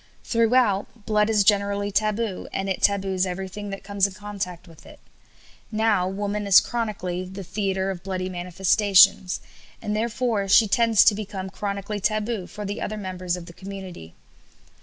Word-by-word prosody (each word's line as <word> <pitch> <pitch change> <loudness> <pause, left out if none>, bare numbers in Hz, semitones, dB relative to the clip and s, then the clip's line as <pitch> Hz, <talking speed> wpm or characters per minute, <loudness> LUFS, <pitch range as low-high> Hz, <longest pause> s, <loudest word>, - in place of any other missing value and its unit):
Throughout, 230 -2 +1
blood 210 0 +2
is 210 -2 +3
generally 200 0 +1
taboo, 215 0 -1
and 195 - -3
it 190 - -2
taboos 190 -2 +1
everything 190 +3 -5
that 195 0 -7
comes 200 0 +1
in 195 - -10
contact 190 -3 -6
with 165 -2 -16
it. - - -15 0.7
Now 215 -4 +2
woman 205 +2 -3
is 195 - +9
chronically 205 -6 -3
"the 190 +2 -8
theatre 190 0 -2
of 180 -2 -7
bloody 185 -1 -3
manifestations," 185 +1 +3 0.4
and 210 - -3
therefore 225 -2 -1
she 215 +3 +6
tends 225 +1 +4
to 220 - +6
become 195 -2 -6
chronically 200 +1 -4
taboo 215 -1 -1
for 210 - -7
the 205 +1 -4
other 215 - -3
members 185 -3 -3
of 175 - -9
the 170 - -12
community. 190 - -9
200 Hz, 160 wpm, -24 LUFS, 190-210 Hz, 0.7 s, is